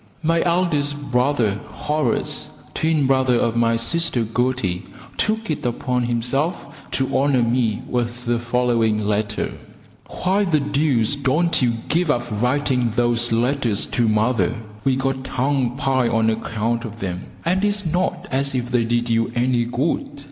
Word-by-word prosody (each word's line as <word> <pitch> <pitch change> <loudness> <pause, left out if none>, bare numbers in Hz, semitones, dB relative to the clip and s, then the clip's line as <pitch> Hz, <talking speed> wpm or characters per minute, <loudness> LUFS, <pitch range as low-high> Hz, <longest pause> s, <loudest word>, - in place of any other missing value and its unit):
My 165 +1 +2
eldest 165 -5 +1
brother, 125 -5 +1
Horace, 150 -5 -1 0.2
twin 155 -3 +1
brother 130 -2 +3
of 115 -1 0
my 115 0 +3
sister 120 +1 +1
Gertie, 115 -5 -1 0.3
took 220 -2 -1
it 150 - -3
upon 125 +1 -1
himself 125 +8 -2
to 130 0 -1
honour 135 -2 +3
me 115 -1 0
with 120 -1 -2
the 120 0 +1
following 120 -3 +1
letter: 105 0 -1 0.6
Why 190 +3 0
the 160 -5 +2
deuce 140 -4 +1
don't 145 +5 +1
you 120 -2 +2
give 170 0 +1
up 120 -5 +2 0.2
writing 125 -2 +1
those 120 -1 +1
letters 120 -2 +1
to 120 -2 +1
mother? 110 -1 +1 0.3
We 135 -1 +2
get 135 0 -1
tongue 130 -1 0
pie 135 -3 +1
on 110 -1 +2
account 115 +1 -2
of 115 -1 -8
them, 90 -2 -4 0.2
and 185 +3 +1
it's 205 -1 +1
not 175 +3 -1
as 135 +1 +1
if 125 -1 -2
they 120 -2 +2
did 120 +1 0
you 115 0 +1
any 120 -1 +2
good. 140 +3 -2
125 Hz, 150 wpm, -21 LUFS, 115-145 Hz, 0.6 s, brother